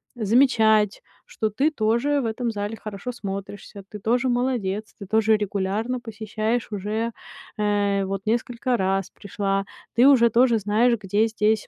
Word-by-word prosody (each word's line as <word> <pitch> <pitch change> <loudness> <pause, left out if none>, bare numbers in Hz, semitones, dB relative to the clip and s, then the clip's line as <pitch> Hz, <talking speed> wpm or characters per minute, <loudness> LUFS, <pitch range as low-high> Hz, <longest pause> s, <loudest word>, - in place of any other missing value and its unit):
замечать, 220 -2 +3 0.2
что 220 - -2
ты 270 +9 +1
тоже 250 +3 +1
в - - -3
этом 230 +1 -2
зале 205 +1 -4
хорошо 215 +4 -6
смотришься, 200 -2 -7
ты 210 - -8
тоже 240 +5 +1
молодец, 240 -5 -1
ты 200 - -8
тоже 220 +1 +3
регулярно 205 +4 -2
посещаешь 220 0 -3
уже, 215 +3 -2 0.4
э, 205 -1 +1
вот 195 0 -3
несколько 240 +2 0
раз 195 -1 0
пришла, 195 0 -3 0.3
ты 245 +3 +6
уже 245 -4 +6
тоже 235 0 +3
знаешь, 215 +4 +2
где 205 +2 +1
здесь 215 -1 0
220 Hz, 145 wpm, -24 LUFS, 205-235 Hz, 0.4 s, ты